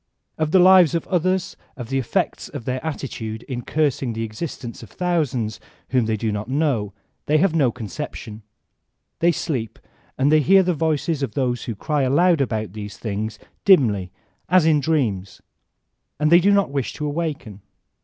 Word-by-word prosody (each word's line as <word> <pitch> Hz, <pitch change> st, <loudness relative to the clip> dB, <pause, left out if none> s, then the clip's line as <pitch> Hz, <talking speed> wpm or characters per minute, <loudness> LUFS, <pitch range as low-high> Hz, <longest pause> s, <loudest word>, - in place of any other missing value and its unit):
Of 155 Hz, -1 st, -1 dB
the 190 Hz, -, +4 dB
lives 180 Hz, -3 st, +6 dB
of 165 Hz, -, -2 dB
others, 185 Hz, 0 st, 0 dB, 0.2 s
of 120 Hz, -3 st, -7 dB
the 135 Hz, 0 st, 0 dB
effects 130 Hz, -, -2 dB
of 115 Hz, -, -8 dB
their 130 Hz, 0 st, -3 dB
attitude 115 Hz, -8 st, -5 dB
in 125 Hz, -3 st, -5 dB
cursing 140 Hz, -4 st, 0 dB
the 115 Hz, 0 st, -3 dB
existences 115 Hz, +1 st, -6 dB
of 115 Hz, -, -11 dB
thousands 145 Hz, -, -1 dB, 0.3 s
whom 125 Hz, -3 st, +2 dB
they 110 Hz, -1 st, 0 dB
do 110 Hz, +1 st, -1 dB
not 105 Hz, +2 st, -4 dB
know, 130 Hz, -8 st, 0 dB, 0.4 s
they 150 Hz, -, +4 dB
have 175 Hz, +1 st, +2 dB
no 140 Hz, -7 st, +3 dB
conception; 115 Hz, -1 st, -7 dB, 0.8 s
they 170 Hz, +1 st, +4 dB
sleep; 130 Hz, -9 st, -3 dB, 0.4 s
and 140 Hz, +2 st, +2 dB
they 155 Hz, -, +6 dB
hear 190 Hz, +6 st, +5 dB
the 180 Hz, 0 st, +1 dB
voices 160 Hz, -1 st, -1 dB
of 135 Hz, -6 st, -3 dB
those 125 Hz, -4 st, -1 dB
who 115 Hz, -, -4 dB
cry 150 Hz, +8 st, -1 dB
aloud 160 Hz, +5 st, +3 dB
about 110 Hz, -7 st, -2 dB
these 105 Hz, -1 st, -7 dB
things, 110 Hz, 0 st, -4 dB, 0.3 s
dimly, 110 Hz, -, +4 dB, 0.4 s
as 180 Hz, -3 st, +5 dB
in 155 Hz, -2 st, +4 dB
dreams; 120 Hz, -11 st, -1 dB, 0.8 s
and 150 Hz, +1 st, +2 dB
they 170 Hz, -, +8 dB
do 190 Hz, +3 st, +3 dB
not 200 Hz, -7 st, +2 dB
wish 140 Hz, -3 st, -2 dB
to 150 Hz, -, -5 dB
awaken. 145 Hz, -, -4 dB
135 Hz, 175 wpm, -22 LUFS, 115-160 Hz, 0.8 s, they